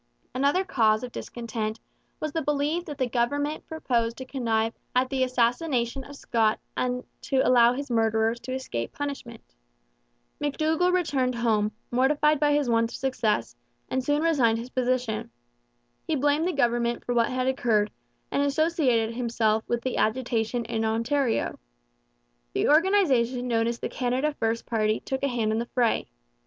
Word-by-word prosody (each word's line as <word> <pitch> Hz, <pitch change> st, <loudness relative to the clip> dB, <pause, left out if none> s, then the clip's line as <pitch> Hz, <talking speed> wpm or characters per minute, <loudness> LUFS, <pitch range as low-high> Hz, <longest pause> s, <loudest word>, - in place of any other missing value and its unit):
Another 280 Hz, +8 st, +2 dB
cause 220 Hz, -, +2 dB
of 250 Hz, -, -5 dB
discontent 225 Hz, -3 st, -4 dB, 0.4 s
was 310 Hz, -, -3 dB
the 325 Hz, -, -1 dB
belief 295 Hz, +4 st, 0 dB
that 295 Hz, -3 st, -7 dB
the 260 Hz, -3 st, 0 dB
government 285 Hz, +6 st, -1 dB
proposed 235 Hz, -7 st, -1 dB
to 260 Hz, -, -6 dB
connive 230 Hz, -4 st, 0 dB, 0.2 s
at 255 Hz, +1 st, +2 dB
the 265 Hz, -1 st, +1 dB
assassination 250 Hz, +1 st, 0 dB
of 285 Hz, -, -11 dB
Scott 225 Hz, -5 st, +1 dB, 0.2 s
and 250 Hz, 0 st, -1 dB, 0.2 s
to 265 Hz, -1 st, +1 dB
allow 240 Hz, -1 st, +6 dB
his 280 Hz, 0 st, -5 dB
murderers 225 Hz, 0 st, +2 dB
to 255 Hz, -, -7 dB
escape 190 Hz, -, -4 dB
punishment. 275 Hz, -5 st, -6 dB, 1.0 s
McDougall 315 Hz, +4 st, +1 dB
returned 275 Hz, -9 st, +1 dB
home, 215 Hz, -3 st, +1 dB, 0.2 s
mortified 290 Hz, +4 st, +3 dB
by 295 Hz, 0 st, +3 dB
his 290 Hz, -2 st, +2 dB
want 230 Hz, -1 st, +2 dB
of -, -, -6 dB
success, 255 Hz, -5 st, -1 dB, 0.3 s
and 260 Hz, 0 st, -1 dB
soon 290 Hz, +3 st, +1 dB
resigned 260 Hz, -9 st, +3 dB
his 240 Hz, +2 st, -7 dB
position. 250 Hz, -3 st, -1 dB, 0.8 s
He 320 Hz, -, +1 dB
blamed 290 Hz, +4 st, +2 dB
the -, -, +1 dB
government 240 Hz, -3 st, 0 dB
for 245 Hz, -, -1 dB
what 235 Hz, -1 st, +2 dB
had 255 Hz, 0 st, -1 dB
occurred, 230 Hz, -5 st, +1 dB, 0.4 s
and 280 Hz, -, +1 dB
associated 280 Hz, -6 st, +1 dB
himself 230 Hz, -2 st, 0 dB
with 235 Hz, -1 st, -1 dB
the 260 Hz, -, -2 dB
agitation 230 Hz, 0 st, 0 dB
in 225 Hz, 0 st, -2 dB
Ontario. 230 Hz, +3 st, 0 dB, 0.9 s
The -, -, +1 dB
organization 285 Hz, -, +3 dB
known 230 Hz, -1 st, +1 dB
as 235 Hz, 0 st, -1 dB
the -, -, -3 dB
Canada 260 Hz, +4 st, -1 dB
First 225 Hz, -4 st, -1 dB
party 215 Hz, -2 st, +1 dB
took 265 Hz, 0 st, -4 dB
a 280 Hz, -, +1 dB
hand 235 Hz, -4 st, 0 dB
in 220 Hz, -, 0 dB
the 235 Hz, -, -3 dB
fray. 240 Hz, -3 st, +2 dB
250 Hz, 160 wpm, -26 LUFS, 230-285 Hz, 1.0 s, allow